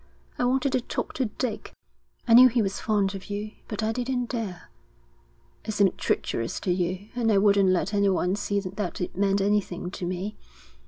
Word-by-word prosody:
I 245 Hz, -, +2 dB
wanted 265 Hz, +2 st, +1 dB
to 255 Hz, -, +1 dB
talk -, -, -4 dB
to 260 Hz, -, 0 dB
Dick 220 Hz, 0 st, -4 dB, 0.5 s
I 230 Hz, -, +5 dB
knew 250 Hz, +2 st, +10 dB
he 235 Hz, -1 st, +1 dB
was 195 Hz, 0 st, -2 dB
fond 205 Hz, -3 st, +1 dB
of 195 Hz, +1 st, -8 dB
you 205 Hz, +1 st, -4 dB, 0.2 s
but 215 Hz, 0 st, -4 dB
I 220 Hz, -, +1 dB
didn't 245 Hz, +1 st, -2 dB
dare. 215 Hz, -8 st, -5 dB, 0.9 s
It 215 Hz, -, -4 dB
seemed 200 Hz, -3 st, +2 dB
treacherous 115 Hz, 0 st, -1 dB
to 185 Hz, -, 0 dB
you, 185 Hz, +3 st, -2 dB
and 230 Hz, -2 st, +1 dB
I 205 Hz, -, +4 dB
wouldn't 200 Hz, -1 st, +4 dB
let 185 Hz, +2 st, +1 dB
anyone 195 Hz, -2 st, +2 dB
see 205 Hz, 0 st, -1 dB
that 190 Hz, -1 st, -4 dB
it 180 Hz, -, -4 dB
meant 195 Hz, +1 st, +2 dB
anything 195 Hz, -3 st, 0 dB
to 185 Hz, -, -7 dB
me. 190 Hz, +4 st, -4 dB
205 Hz, 190 wpm, -26 LUFS, 190-225 Hz, 0.9 s, knew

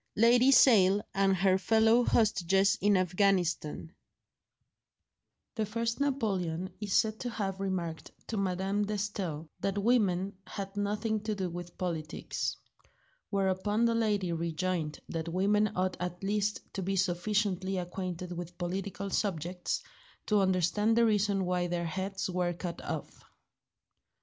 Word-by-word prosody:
XIII 215 Hz, -, +3 dB
LADY 245 Hz, +3 st, +6 dB
SALE 205 Hz, -7 st, +6 dB
AND 195 Hz, -1 st, +3 dB
HER 190 Hz, +1 st, +3 dB
FELLOW 225 Hz, +3 st, +4 dB
HOSTAGES 195 Hz, -3 st, +3 dB
IN 205 Hz, 0 st, +4 dB
AFGHANISTAN 180 Hz, -4 st, +1 dB, 1.6 s
THE 220 Hz, -, -1 dB
first 230 Hz, +3 st, -2 dB
Napoleon 195 Hz, -, -1 dB
is 205 Hz, -2 st, -2 dB
said 220 Hz, 0 st, +2 dB
to 245 Hz, -, -3 dB
have 195 Hz, -4 st, -3 dB
remarked 180 Hz, -4 st, -3 dB, 0.2 s
to 225 Hz, -, -4 dB
Madame 195 Hz, +1 st, 0 dB
de 210 Hz, +1 st, -2 dB
Staël 190 Hz, -6 st, -3 dB
that 195 Hz, 0 st, -1 dB
women 200 Hz, -4 st, +2 dB
had 195 Hz, 0 st, -6 dB
nothing 210 Hz, +2 st, -1 dB
to 215 Hz, 0 st, -3 dB
do 185 Hz, -3 st, -3 dB
with 175 Hz, 0 st, -8 dB
politics; 165 Hz, -4 st, -3 dB, 0.7 s
whereupon 200 Hz, +3 st, +1 dB
the 230 Hz, -, +3 dB
lady 210 Hz, -5 st, +1 dB
rejoined 165 Hz, -1 st, -2 dB
that 165 Hz, 0 st, -4 dB
women 205 Hz, +4 st, +2 dB
ought 185 Hz, 0 st, 0 dB
at 180 Hz, +1 st, -4 dB
least 205 Hz, +1 st, 0 dB
to 195 Hz, -, -3 dB
be 195 Hz, +2 st, -1 dB
sufficiently 190 Hz, +1 st, 0 dB
acquainted 180 Hz, 0 st, -4 dB
with 175 Hz, 0 st, -6 dB
political 195 Hz, +2 st, -4 dB
subjects 180 Hz, -3 st, -2 dB, 0.4 s
to 210 Hz, -2 st, +3 dB
understand 190 Hz, +4 st, +2 dB
the 235 Hz, -, +5 dB
reason 205 Hz, -3 st, +2 dB
why 180 Hz, 0 st, 0 dB
their 175 Hz, 0 st, -2 dB
heads 190 Hz, +3 st, -3 dB
were 180 Hz, -1 st, -1 dB
cut 170 Hz, 0 st, -6 dB
off. -, -, -6 dB
195 Hz, 135 wpm, -30 LUFS, 180-210 Hz, 1.6 s, LADY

